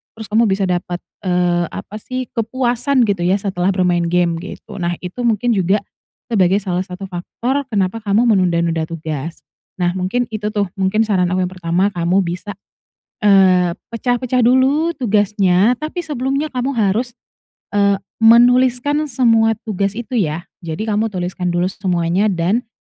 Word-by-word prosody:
terus 220 -1 -8
kamu 225 +2 +4
bisa 195 0 0
dapat, 175 -1 -2 0.3
eee, 175 -1 +1
apa, 210 - -8
sih, 255 +2 -5
kepuasan 245 +2 0
gitu, 200 -4 0
ya, 185 - +3
setelah 190 -3 -2
bermain 175 -2 +1
game 170 -1 +1
gitu. 200 +3 -9
Nah, 175 0 -1
itu 180 +7 -6
mungkin 230 +2 +1
juga 195 +1 +1 0.5
sebagai 195 -2 +3
salah 180 -1 -1
satu 180 +2 -8
faktor 245 +10 -3
kenapa 200 +1 0
kamu 215 +4 +2
menunda-nunda 170 -4 +1
tugas. 160 -1 -6 0.4
Nah, 175 -1 +2
mungkin 190 +7 0
itu, 215 -1 -3
tuh, 205 -1 +1
mungkin 195 +4 +2
saran 190 -5 +1
aku 185 - +1
yang 180 - -3
pertama 180 +2 0
kamu 180 +2 +1
bisa, 180 +3 -5 0.7
eee, 185 -3 +5 0.2
pecah-pecah 245 +1 0
dulu 265 +7 +3
tugasnya 210 -1 +2
tapi 315 +4 -4
sebelumnya 285 0 -2
kamu 255 +1 -1
harus, 230 +3 0 0.6
eee, 200 -1 +3 0.2
menuliskan 250 +5 +4
semua 230 -4 +3
tugas 200 -2 -2
itu, 240 +2 -3
ya, 165 -4 -1 0.2
jadi 170 +7 -4
kamu 215 +2 +1
tuliskan 180 -1 -3
dulu 175 +2 +1
semuanya 180 +1 0
dan 195 +5 0
200 Hz, 150 wpm, -18 LUFS, 180-235 Hz, 0.7 s, eee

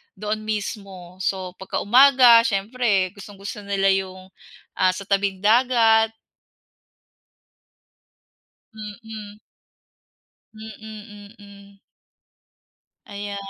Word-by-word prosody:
doon 210 +2 -4
mismo. 195 -4 -6
So, 185 -2 -2
pagka 190 - -4
umaga 250 0 +7
siyempre 205 -3 0
gustong-gusto 200 0 -9
nila 195 -1 +1
yung, 185 -1 -5 0.5
ah, 185 - +4
sa 200 - -7
tabing 195 -1 -1
dagat. 225 -1 +3 2.6
Mm. 215 -1 -10 1.2
Mm, 215 -1 -12
mm. 200 -1 -16 1.3
Aya 205 0 -7
205 Hz, 75 wpm, -22 LUFS, 195-220 Hz, 2.6 s, umaga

